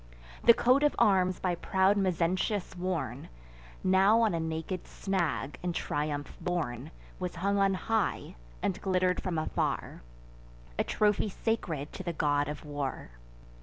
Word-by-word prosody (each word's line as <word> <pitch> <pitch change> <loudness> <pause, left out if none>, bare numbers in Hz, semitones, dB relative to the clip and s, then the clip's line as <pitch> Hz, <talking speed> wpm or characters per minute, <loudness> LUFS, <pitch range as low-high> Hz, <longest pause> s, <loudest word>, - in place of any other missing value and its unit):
The 235 - +8
coat 255 +5 +4
of 295 0 +3
arms 185 -3 +3
by 180 -1 0
proud 190 +3 +2
Mezentius 185 +1 0
worn, 180 -1 -3 0.5
Now 195 +4 +5
on 220 -5 +3
a 165 - 0
naked 160 +2 -4
snag 175 -7 -2
in 175 -1 -2
triumph 145 -3 -3
borne, 155 -7 -2 0.3
Was 180 -1 -4
hung 200 +4 0
on 195 -1 +3
high, 220 +1 -1 0.3
and 190 - -1
glitter'd 185 -1 +1
from 180 -3 -2
afar, 155 - -2 0.8
A - - +4
trophy 210 0 +1
sacred 170 -9 -2
to - - -6
the 175 -2 -3
God 145 -2 +1
of 150 +1 -6
War. 145 - -4
180 Hz, 140 wpm, -30 LUFS, 160-195 Hz, 0.8 s, The